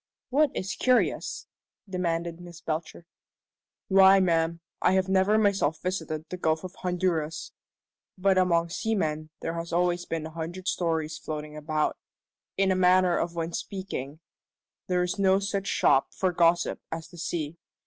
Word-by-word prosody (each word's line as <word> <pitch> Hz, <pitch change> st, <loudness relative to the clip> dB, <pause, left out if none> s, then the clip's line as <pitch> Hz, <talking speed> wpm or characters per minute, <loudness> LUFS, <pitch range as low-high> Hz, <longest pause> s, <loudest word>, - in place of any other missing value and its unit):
"What 295 Hz, +3 st, +4 dB
is 195 Hz, +1 st, -2 dB
curious?" 255 Hz, -1 st, +1 dB, 0.4 s
demanded 170 Hz, -2 st, -2 dB
Miss 175 Hz, -1 st, -11 dB
Belcher. 160 Hz, +1 st, -4 dB, 0.8 s
"Why, 195 Hz, 0 st, +7 dB
ma'am, 165 Hz, -2 st, +1 dB, 0.2 s
I -, -, +4 dB
have 190 Hz, 0 st, +2 dB
never 190 Hz, +3 st, +3 dB
myself 195 Hz, -8 st, +2 dB
visited 160 Hz, -4 st, -3 dB
the 180 Hz, -, -5 dB
Gulf 160 Hz, -1 st, 0 dB
of 185 Hz, 0 st, -7 dB
Honduras, 175 Hz, -4 st, -2 dB, 0.7 s
but 190 Hz, +1 st, +3 dB
among 170 Hz, -2 st, +3 dB
seamen 155 Hz, -6 st, -1 dB
there 165 Hz, -, -2 dB
are 165 Hz, 0 st, -3 dB
always 175 Hz, 0 st, +1 dB
a 160 Hz, -1 st, -3 dB
hundred 170 Hz, +3 st, -6 dB
stories 160 Hz, -3 st, -1 dB
floating 150 Hz, +1 st, -6 dB
about. 155 Hz, 0 st, -1 dB, 0.6 s
In 195 Hz, 0 st, +3 dB
a -, -, +2 dB
manner 185 Hz, -1 st, +4 dB
of 170 Hz, 0 st, -1 dB, 0.2 s
speaking, 165 Hz, -6 st, -5 dB, 0.7 s
there 180 Hz, -1 st, +2 dB
is 180 Hz, +3 st, -3 dB
no 190 Hz, -1 st, +4 dB
such 200 Hz, 0 st, -2 dB
shop 135 Hz, -, +3 dB
for 185 Hz, -1 st, +1 dB
gossip 170 Hz, 0 st, +2 dB
as 165 Hz, -1 st, -5 dB
the 175 Hz, -, -12 dB
sea. 165 Hz, -1 st, -3 dB
175 Hz, 145 wpm, -27 LUFS, 160-190 Hz, 0.8 s, Why